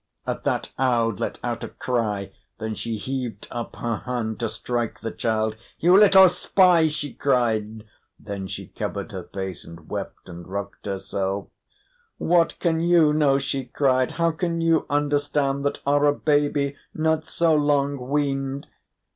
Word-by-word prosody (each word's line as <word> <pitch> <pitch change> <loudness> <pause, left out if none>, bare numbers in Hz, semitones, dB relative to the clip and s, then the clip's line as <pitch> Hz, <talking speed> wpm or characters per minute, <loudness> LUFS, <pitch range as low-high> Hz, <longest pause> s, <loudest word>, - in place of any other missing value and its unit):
At - - -3
that - - -1
Aud 115 -5 +2
let - - -2
out - - -3
a - - -3
cry. 105 -6 -2 0.3
Then 110 0 -4
she 115 +1 -3
heaved 125 -2 -4
up 120 -1 -5
her 115 -2 -2
hand 120 -3 -3
to 115 -2 -1
strike 120 -1 -3
the 115 - -3
child. 110 -1 -1 0.2
"You 175 +3 +5
little 195 -2 +8
spy!" 180 -2 +4
she 145 -3 -3
cried. 110 -5 0 0.4
Then 100 -1 -6
she - - -6
covered - - -5
her - - -6
face, 95 -2 -6
and 85 -1 -13
wept, - - -5
and 85 -1 -9
rocked 100 +2 -6
herself. 95 0 -3 0.7
"What 170 0 +2
can 165 -2 +1
you 165 -3 +4
know?" 145 -3 +3
she 135 -1 -2
cried. 130 0 +1
"How 170 0 +2
can 165 +1 -2
you 165 -1 +2
understand, 145 -1 +1
that 140 - 0
are 145 +1 +3
a 145 - +3
baby, 145 -2 +1 0.2
not 160 0 +1
so 165 0 +1
long 145 -2 +2
weaned? 140 -1 -1
135 Hz, 155 wpm, -24 LUFS, 110-150 Hz, 0.7 s, little